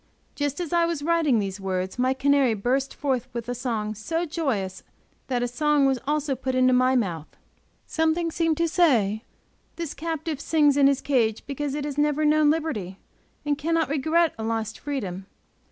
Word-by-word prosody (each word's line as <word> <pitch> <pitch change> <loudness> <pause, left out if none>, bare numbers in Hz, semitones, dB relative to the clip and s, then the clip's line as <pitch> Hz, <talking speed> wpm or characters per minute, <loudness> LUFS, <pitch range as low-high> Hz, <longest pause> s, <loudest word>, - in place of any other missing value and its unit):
Just 290 +1 -2
as 345 -2 -4
I 340 -1 +4
was 335 -4 -2
writing 325 -6 +2
these 195 -2 -2
words, 185 +2 -3
my 255 +1 +2
canary 275 -3 +3
burst 260 +6 0
forth 260 -4 -1
with 235 -1 -5
a 245 - -2
song 230 -4 -2
so 325 - -2
joyous 250 - -2 0.5
that 245 -2 0
a - - 0
song 295 +3 +2
was 265 -2 +2
put 270 - -27
also 295 -2 0
into 255 -1 +3
my 255 +1 +3
mouth. 175 -10 -1 0.6
Something 320 +1 0
seemed 330 -1 0
to 335 - +2
say, 245 - +2 0.5
this 335 -3 -4
captive 320 -2 -4
sings 295 -3 +3
in 280 -1 +5
his 275 -1 +2
cage 230 -6 +1
because 285 0 -3
it 295 -1 -3
has 290 -1 -4
never 295 +1 +2
known 300 0 +4
liberty, 265 - -2 0.5
and 290 -1 0
cannot 330 +1 0
regret 315 +3 +2
a - - -3
lost 225 -1 -3
freedom. 195 -10 -4
275 Hz, 180 wpm, -25 LUFS, 235-310 Hz, 0.6 s, in